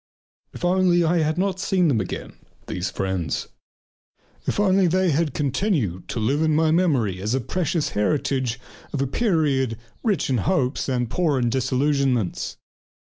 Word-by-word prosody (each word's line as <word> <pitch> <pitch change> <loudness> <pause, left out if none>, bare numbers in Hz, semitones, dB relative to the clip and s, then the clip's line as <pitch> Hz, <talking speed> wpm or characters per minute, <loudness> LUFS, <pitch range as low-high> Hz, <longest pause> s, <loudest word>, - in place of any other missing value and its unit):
If - - -5
only 180 -1 +3
I 170 +1 +2
had 155 +1 0
not 190 0 0
seen 185 -2 +2
them 120 -8 +2
again, 95 - -6 0.3
these - - -3
friends! 95 -5 -2 1.0
If - - 0
only 195 -2 +4
they 185 +2 +2
could - - +1
have 160 -4 0
continued 135 - -1
to - - -3
live 135 +8 +1
in 155 -1 +2
my 160 0 +3
memory 135 - +1
as 110 +5 0
a - - +1
precious 165 +4 -1
heritage 130 +2 0 0.3
from 140 - -3
a - - +2
period 140 - +1
that - - -9
was 115 - -25 0.2
rich 210 -10 +1
in 130 - +2
hopes 130 +8 0
and 125 -2 0
poor 155 +2 +1
in 120 -2 +1
disillusionments. 130 -4 0
140 Hz, 170 wpm, -23 LUFS, 120-175 Hz, 1.0 s, only